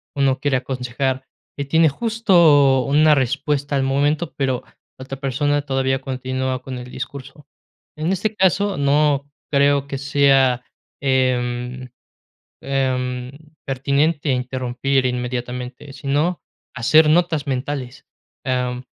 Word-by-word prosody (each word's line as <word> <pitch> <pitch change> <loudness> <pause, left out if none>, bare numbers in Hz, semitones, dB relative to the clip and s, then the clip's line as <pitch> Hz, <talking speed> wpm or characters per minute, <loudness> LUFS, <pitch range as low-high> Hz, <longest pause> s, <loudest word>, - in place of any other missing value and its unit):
uno 135 -2 +2
quiere 145 -2 0
aconsejar, 130 +1 -2 0.3
y 140 - -3
tiene 160 +3 +4
justo 165 - +4
una 150 +3 +4
respuesta 140 +2 0
al 135 - +1
momento, 145 +5 0
pero 130 -3 -1 0.3
la 130 - -9
otra 135 0 -7
persona 145 +2 0
todavía 135 -1 0
continúa 130 -1 -3
con 130 -1 -7
el 125 0 -8
discurso. 135 +2 -8 0.5
En 155 +4 -1
este 205 +3 -1
caso, 195 +1 +2
no 145 0 +2 0.2
creo 140 0 +3
que 140 - -5
sea, 135 -2 +3 0.4
em 125 -1 -1 0.8
em, 125 -2 -1 0.3
pertinente 140 +3 0
interrumpir 130 +1 -1
inmediatamente, 125 +2 -5
sino 145 +6 -1 0.3
hacer 150 +6 +5
notas 160 -3 +2
mentales, 130 -1 -4 0.4
am, 125 -1 -1
135 Hz, 115 wpm, -21 LUFS, 130-145 Hz, 0.8 s, hacer